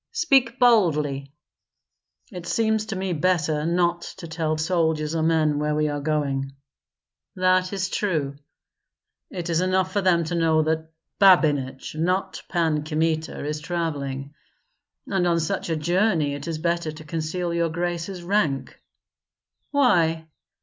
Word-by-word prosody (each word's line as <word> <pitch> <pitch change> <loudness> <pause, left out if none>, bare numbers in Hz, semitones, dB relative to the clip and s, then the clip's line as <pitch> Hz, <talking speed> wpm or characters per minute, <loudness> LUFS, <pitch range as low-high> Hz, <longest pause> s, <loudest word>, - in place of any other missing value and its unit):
"Speak 270 - +3
boldly." 150 - +2 1.0
"It 180 -3 -8
seems 220 0 +1
to 215 - -4
me 190 -1 -2
better 160 -2 +1
not 175 0 +1 0.2
to 175 -3 -8
tell 160 -1 -2
soldiers 160 -2 0
or 165 - 0
men 155 -2 +2
where 150 0 0
we 150 0 +1
are 145 0 -2
going." 140 -3 -1 0.8
"That 185 0 +2
is 190 -2 -1
true." 155 -9 -1 0.9
"It 175 -3 -5
is 170 0 +1
enough 185 0 +1
for 205 - +1
them 175 -3 +3
to 165 +2 -4
know 160 -2 +3
that 160 0 -1 0.3
Babinich, 145 -9 +3
not 185 +4 -1
Pan 160 -4 +1
Kmita, 160 -1 -1
is 150 +1 -3
travelling. 145 -4 -3 0.7
And 190 -3 0
on 170 -1 +2
such 175 +3 -2
a 165 - +1
journey 170 -1 +1
it 145 +2 -6
is 165 -2 -2
better 170 0 -1
to 155 +1 -11
conceal 165 +3 -3
your 170 0 +1
grace's 175 +2 -3
rank." 170 -8 -1 0.9
"Why?" 170 - +2
165 Hz, 140 wpm, -24 LUFS, 155-185 Hz, 1.0 s, Speak